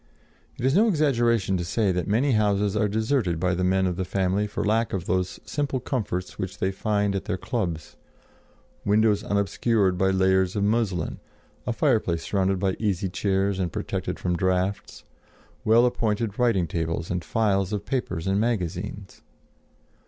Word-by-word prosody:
It 120 - -3
is 135 - +3
no 210 +7 +5
exaggeration 120 - +2
to 90 - -2
say 100 +3 +1
that 90 -1 -2
many 120 +7 +2
houses 105 -2 +2
are 105 0 +2
deserted 110 - 0
by 90 +1 +1
the 90 +1 -1
men 95 +1 +2
of 90 -2 -1
the 95 - -1
family 95 +2 0
for 105 - -3
lack 110 +2 +1
of 90 -3 -2
those 90 0 -1
simple 140 -3 -2
comforts 110 -8 -3
which 95 0 -4
they 95 - 0
find 100 0 0
at 95 - -3
their 90 - -2
clubs: 90 - -4 0.9
windows 105 0 +3
unobscured 100 -1 +1
by 95 - +3
layers 95 0 +2
of 100 - 0
muslin, 105 -5 0 0.5
a - - +1
fireplace 85 -1 +1
surrounded 95 -1 +1
by 95 0 0
easy 100 -3 0
chairs 95 +1 0
and 90 -3 -1
protected - - -3
from 90 -1 -1
draughts, 95 +2 -1 0.6
well 115 +3 +5
appointed 110 -2 -1
writing 115 -8 +3
tables 80 0 -3
and 90 -1 -2
files 100 0 +1
of 105 -1 -3
papers 125 -11 -2
and 95 +1 +1
magazines. 100 -2 -3
100 Hz, 165 wpm, -25 LUFS, 95-110 Hz, 0.9 s, no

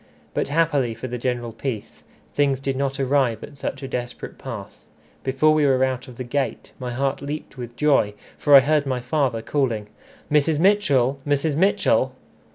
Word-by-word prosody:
But - - 0
happily 145 -6 +1
for 115 +3 -6
the 125 0 -4
general 120 -1 -2
peace, 115 -2 -5 0.3
things 140 -2 +2
did 135 0 -2
not 135 +1 -1
arrive 130 -4 +1
at 145 - -10
such 140 0 -4
a - - -3
desperate 120 -2 -5
pass. - - -8 0.4
Before 135 +4 +3
we 155 -1 +3
were 130 -2 +4
out 130 0 -1
of 125 -2 -12
the 130 - -4
gate, 135 +2 -2
my 125 -2 -4
heart 135 +2 -1
leaped 145 +1 -6
with 120 -2 -8
joy, 135 -9 +3 0.2
for 145 -1 +5
I 135 - +11
heard 145 +1 +2
my 130 -2 0
father 125 -3 0
calling, 115 -8 -1 0.4
"Mrs. 150 +1 +3
Mitchell! 145 -8 +3
Mrs. 145 +1 +1
Mitchell!" 190 +6 +2
135 Hz, 175 wpm, -23 LUFS, 125-145 Hz, 0.4 s, I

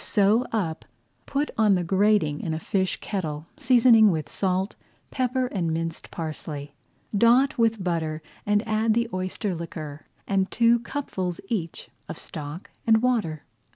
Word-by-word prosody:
Sew 210 +4 +3
up, 170 -8 -2 0.4
put 285 +2 -1
on 210 -3 +5
the 180 - 0
grating 190 -4 +2
in 160 - -2
a - - -3
fish 190 +2 -1
kettle, 155 -7 -3
seasoning 235 -4 +6
with 160 -4 -2
salt, 190 +1 -1 0.4
pepper, 255 0 0
and 185 -9 -2
minced 165 0 -3
parsley. 150 -3 -6 0.4
Dot 245 +6 +4
with 225 -3 +2
butter 160 -3 -2 0.2
and 205 +2 +1
add 220 0 +2
the 235 0 +1
oyster 185 +1 -2
liquor, 155 -3 -7 0.2
and 195 -1 +1
two 235 +1 +4
cupfuls 190 - -4
each 175 -8 -3 0.2
of - - -5
stock 150 +4 -7 0.2
and 220 0 +5
water. 210 - 0
195 Hz, 145 wpm, -25 LUFS, 165-225 Hz, 0.4 s, seasoning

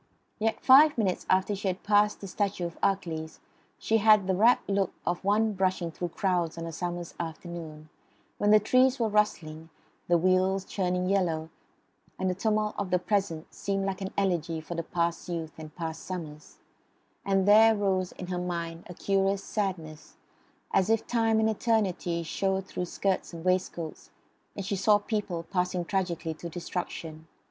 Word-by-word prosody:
Yet 225 +1 0
five 290 +3 +7
minutes 195 -5 -1
after 190 +2 +2
she 195 0 -4
had 185 0 -2
passed 210 0 +3
the 200 - -6
statue 195 -2 -2
of 170 - -6
Achilles 165 -5 -1 0.4
she 225 - +1
had 215 -2 +5
the 190 - +1
rapt 225 +6 +4
look 195 -2 +1
of 175 +2 -1
one 210 +2 +2
brushing 185 -3 0
through 175 +2 -4
crowds 175 -2 -1
on 165 - -4
a 165 - -5
summer's 175 +1 -4
afternoon, 165 -2 -7 0.5
when 205 - +2
the 215 0 +7
trees 255 +4 +3
are 225 -2 +1
rustling, 165 -7 -1 0.4
the 175 - +4
wheels 185 +2 +2
churning 180 -1 -1
yellow, 165 -5 0 0.7
and 185 0 0
the - - -1
tumult 215 +2 0
of 200 -2 -2
the 180 - +3
present 180 -4 -2
seems 195 -1 -2
like 195 0 -3
an 190 - -4
elegy 170 -5 0
for 160 +2 -7
past 170 +2 -2
youth 165 -2 -4
and 155 -1 -10
past 165 -2 -5
summers, 155 -5 -7 0.7
and 195 -1 +1
there 220 +2 +7
rose 190 -3 0
in 180 - -7
her 180 0 -3
mind 170 -2 -4
a 180 - -8
curious 195 +1 +1
sadness, 170 -8 -4 0.6
as 195 +1 +3
if 225 -1 +2
time 225 -2 +2
and 220 - +3
eternity 200 -6 0
showed 190 +3 -1
through 180 - -4
skirts 190 +1 -2
and 165 +1 -8
waistcoasts, 180 -3 -2 0.5
and 200 - -5
she 200 +1 -1
saw 205 +2 +4
people 205 -5 -3
passing 180 0 -1
tragically 175 -4 -2
to 170 +2 -8
destruction. 165 -2 -6
185 Hz, 170 wpm, -28 LUFS, 170-205 Hz, 0.7 s, five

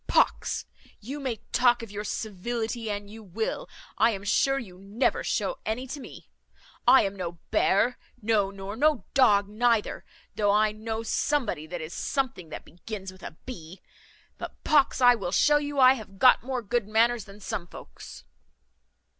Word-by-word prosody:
"Pox! - - +1 0.3
you 270 +8 -6
may 260 -4 -2 0.2
talk 245 -1 +3
of 225 - -9
your 205 0 -5
civility 225 +3 -3
an 205 0 -4
you 220 +2 -11
will, 220 - -4 0.3
I 225 - +6
am 200 -3 -4
sure 270 +7 +2
you 190 -9 -8
never 200 +6 0
shew - - -1
any 230 +4 -2
to 275 +3 -6
me. - - -11 0.6
I 265 - +8
am 195 0 -2
no 175 -3 -4 0.2
bear, 230 +6 +2 0.2
no, 210 -3 +1
nor 195 +1 -7
no 285 -4 +2
dog 205 -7 +5
neither, 225 +1 +1 0.3
though 205 0 +1
I 210 +1 +4
know 220 +1 -4
somebody, 225 - -1
that 175 +1 -5
is 155 +2 -7
something 255 - -2
that - - -8
begins 190 +1 -8
with 185 0 -17
a 160 - -9
b; 180 -8 -9 0.6
but - - -8
pox! 285 -3 +3
I 245 0 +8
will 195 -7 -3
show 295 +9 +4
you 290 -1 -3
I 255 0 +8
have 210 -6 -9
got 255 +5 +6
more 250 -1 -3
good 220 +1 -1
manners 225 0 +2
than 200 +1 -13
some 200 -3 -4
folks." - - -12
220 Hz, 170 wpm, -27 LUFS, 195-245 Hz, 0.6 s, I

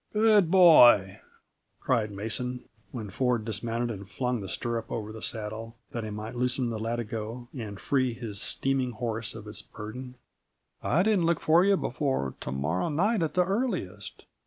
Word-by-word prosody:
"Good 210 -4 +5
boy!" 125 - +7 0.6
cried 115 -4 +1
Mason, 115 +5 -3 0.3
when 110 -5 -6
Ford 125 -3 0
dismounted 115 +2 -2
and 100 -2 -8
flung 125 +2 -1
the 95 - -6
stirrup 115 +4 -2
up - - -18
over 110 -2 -4
the 110 0 -9
saddle, 110 +1 -4 0.2
that 115 - -4
he 110 - -4
might 105 +2 -6
loosen 125 0 0
the 110 - -3
latigo 115 +1 -4
and 105 -6 -6
free 130 -4 +1
his 110 -4 -5
steaming 135 -2 -1
horse 115 -2 -3
of 110 -1 -9
its 105 - -5
burden. 125 +4 -8 0.7
"I 170 +5 +2
didn't 200 -5 +3
look 170 -1 +2
for 165 +3 +4
you 200 0 +4
before 130 - -1
to - - -4
morrow 75 - -1
night, 195 +7 +1
at 160 +1 -1
the 180 -1 +4
earliest. 175 - -3
120 Hz, 170 wpm, -28 LUFS, 110-135 Hz, 0.7 s, boy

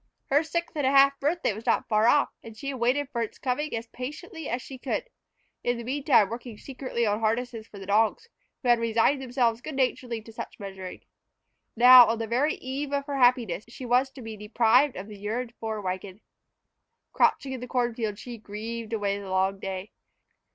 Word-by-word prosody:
Her 285 +2 +5
sixth 340 +2 -3
and 290 -3 +1
a - - +5
half 275 0 +5
birthday 310 -3 0
was 220 +4 -10
not - - +2
far 215 0 +3
off, 290 +4 +4
and 225 -1 -12
she 275 - -5
had 265 -2 -5
waited 260 +4 +1
for 235 - -2
its 225 - -4
coming 285 +3 -2
as 225 0 -4
patiently 300 - -7
as 245 - -1
she 260 +1 -10
could, - - -2 0.6
in 245 0 0
the 235 - -6
meantime 265 -4 +3
working 235 -1 -7
secretly 255 -2 -3
on 210 0 +1
harnesses 225 0 -1
for 205 - -13
the 195 - -8
dogs, 225 - +2 0.4
who 250 - +1
had 240 -1 +5
resigned 230 +4 +2
themselves 240 -3 0
good 310 +1 -6
naturedly 250 -3 -1
to 225 - -13
much - - -7
measuring. 190 -2 -8 0.7
Now, 245 0 +10
on 230 - 0
the 225 - -2
very 255 +7 +1
eve 275 +2 -5
of 280 -1 -1
her 285 -1 -3
happiness, 245 -7 +3
she 245 +2 -9
was 250 +2 +3
to 260 - -10
be 225 -1 -6
deprived 230 +6 +3
of 190 +2 -7
the 210 -2 -10
yearned 230 +4 -3
for 220 -1 -3
wagon. 190 +1 -5 0.9
Crouching 265 -1 +2
in 260 - -5
the 250 - -7
corn 245 -2 0
field, 220 -3 -3
she 240 0 -8
grieved 220 +2 -6
away 205 -2 -1
the 200 -1 -8
long 190 +1 +1
day. 190 +1 -5
235 Hz, 205 wpm, -27 LUFS, 215-265 Hz, 0.9 s, Now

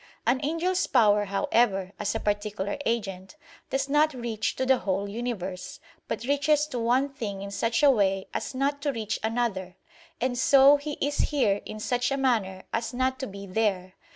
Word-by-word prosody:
An 245 +3 +3
angel's 330 +5 0
power, 210 -4 +4
however, 195 -1 +1
as 210 0 -1
a - - 0
particular 205 -1 -2
agent, 195 -2 -3 0.3
does 270 0 -1
not 295 +1 +3
reach 230 -3 -2
to 260 - -1
the 260 -1 +4
whole 195 +1 -1
universe, 200 -5 -5 0.3
but - - -3
reaches 285 +3 +2
to 250 - -3
one 245 +4 +2
thing 205 -7 -5
in 200 - -6
such 230 +5 0
a 285 - +8
way 195 -5 +1
as - - -4
not 280 +2 0
to 285 -1 0
reach 220 -4 -3
another; 220 -5 -1 0.4
and 245 -1 -1
so 275 +2 +7
he 295 +1 -5
is 290 0 -2
"here" 220 -9 +1
in 215 - -7
such 245 +3 0
a 275 - -1
manner 215 -8 0
as 230 +2 -2
not 260 +1 0
to 265 - -3
be 200 -1 -8
"there." 185 -2 -1
235 Hz, 180 wpm, -27 LUFS, 200-270 Hz, 0.4 s, a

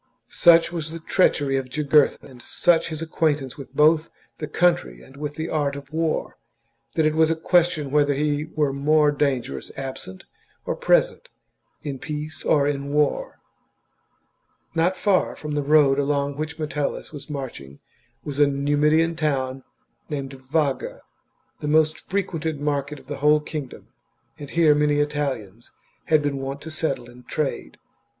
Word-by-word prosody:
Such 170 -1 +5
was 165 -3 -4
the 165 +1 -7
treachery 145 -5 +2
of 130 -1 -4
Jugurtha 150 +1 +2
and 125 -3 -13
such 170 +6 +2
his 160 0 -4
acquaintance 150 -5 0
both 150 +3 +2
with - - -27 0.3
the 150 - -4
country 145 - +1
and 135 - -16
with 145 +1 -5
the 160 +1 -3
art 145 -3 -1
of 140 +1 -10
war, 160 -1 -1 0.6
that 160 - +2
it 155 - +2
was 160 0 +3
a 165 - +2
question 160 -3 +1
whether 145 -1 +3
he 150 +1 0
were 150 -3 -1
more 150 +2 +3
dangerous 130 - -2
absent 130 -9 -7 0.4
or - - -1
present, - - +2 0.5
in 140 -3 -5
peace 150 +2 -6
or 145 -2 +3
in 140 -1 -2
war. 150 0 0 1.3
Not 170 +3 +1
far 200 -3 +1
from 150 - -7
the 145 - 0
road 145 -1 +4
along 140 0 0
which 155 +1 -5
Metellus 150 -2 -3
was 145 -2 -9
chap. 150 - -7
marching 95 - -7 0.4
was 145 -1 -5
a 145 - +6
Numidian 150 +4 +2
town 135 -4 -1 0.5
named 140 -3 -4
Vaga, 135 +1 -2 0.6
the 150 - -4
most 155 +1 +3
frequented 165 -6 -3
market 145 0 -2
of - - -19
the 145 +1 -6
whole 150 +2 +4
kingdom; 150 -3 -7 0.5
and 145 -2 -8
here 165 -2 +4
many 150 0 +2
Italians 135 -8 -3 0.3
had 155 -2 +3
been 145 -1 -1
wont 135 +1 -4
to 160 - -8
settle 155 -6 -2
and 125 +1 -16
trade. 140 - -3
150 Hz, 155 wpm, -23 LUFS, 140-155 Hz, 1.3 s, a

